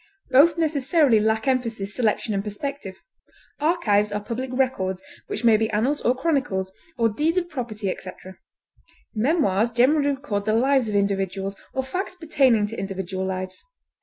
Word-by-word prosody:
Both 305 +5 +6
necessarily 295 -5 +3
lack 220 +3 0
emphasis, 230 -6 -1
selection, 220 -2 0
and 195 0 -1
perspective. 210 -1 -5 0.6
Archives 220 - +2
are 205 - -1
public 235 +5 -5
records, 225 -8 -1 0.2
which - - -4
may 225 -2 +6
be 220 0 0
annals, 240 +7 0
or 245 - +2
chronicles, 255 - -1 0.3
or 230 -1 +3
deeds 305 - 0
of 355 -1 +1
property, 225 -7 -4
etc. 185 0 -7 0.7
Memoirs 225 - +2
generally 280 +5 +3
record 265 -8 -2
the 215 - +1
lives 260 0 +2
of 210 - -2
individuals 195 -1 -1 0.2
or 265 - 0
facts 365 +8 -4
pertaining 275 - +2
to 225 +2 -6
individual 190 -1 -4
lives. 185 0 -5
230 Hz, 150 wpm, -24 LUFS, 200-275 Hz, 0.7 s, Both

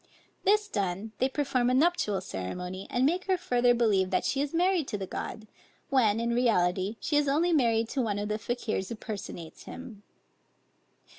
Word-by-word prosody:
This 420 +1 +4
done, 200 - -2
they 260 - +2
perform 260 -3 +1
a 255 - +2
nuptial 275 - +2
ceremony, 180 - -5
and 245 +1 +1
make 350 +6 +1
her 375 -1 +2
further 245 -7 +2
believe 205 -6 +2
that 185 - 0
she 270 - 0
is 285 0 -2
married 350 -2 +2
to 210 - -3
the 195 - -4
god; 220 +3 -6 0.5
when, 225 -5 +3
in 235 0 0
reality, 200 -4 +2
she 295 - 0
is 295 -1 +2
only 325 +5 +2
married 230 -6 +3
to 270 - -1
one 210 -4 -1
of 205 0 -2
the 215 +1 -2
Fakiers 220 -5 -2
who 230 - -4
personates 200 -7 -7
him. 225 -5 -9
235 Hz, 180 wpm, -29 LUFS, 205-275 Hz, 0.5 s, This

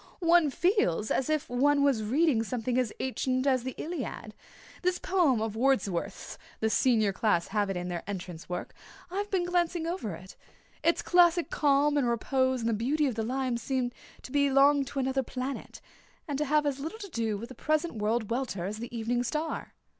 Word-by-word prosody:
One 340 -3 +4
feels 270 - +1
as 265 - 0
if 310 -2 0
one 280 +3 +3
was 275 -6 +3
reading 260 +3 +2
something 245 +2 -1
as 245 -4 0
ancient 255 0 -1
as 260 -3 +3
the 260 +1 -5
Iliad. 335 +2 -5 0.5
This 365 0 +1
poem 345 - +2
of 220 -1 -3
Wordsworth's 230 -8 -1 0.2
the 220 0 +1
Senior 220 -6 +3
class 190 -5 +1
have 205 -1 0
it 195 - -2
in 180 0 -4
their 175 -2 -3
entrance 180 -4 -6
work 180 0 -4 0.4
I've 405 +2 -2
been 370 -3 0
glancing 350 -1 0
over 330 - -3
it. 185 +3 -12 0.5
Its 335 - +2
classic 350 -1 +4
calm 290 0 +3
and 255 -4 +2
repose 260 +2 +1
and 230 - 0
the - - +1
beauty 275 +8 +1
of 265 - 0
the 225 - -2
lines 250 +1 -1
seem 255 0 -1 0.3
to - - -9
belong 280 0 +4
to 275 - -8
another 265 0 +1
planet, 260 +2 -6 0.5
and 290 - -2
to 300 - +1
have 300 +1 +2
as 280 -2 -1
little 320 +9 -5
to 405 -3 -8
do 225 - -1
with 230 +4 -8
the - - -8
present 310 +5 0
world 220 0 -1
welter 230 -8 -2
as 210 +3 -4
the 235 +1 -6
evening 240 +2 0
star." 305 +6 -3
260 Hz, 190 wpm, -29 LUFS, 225-300 Hz, 0.5 s, One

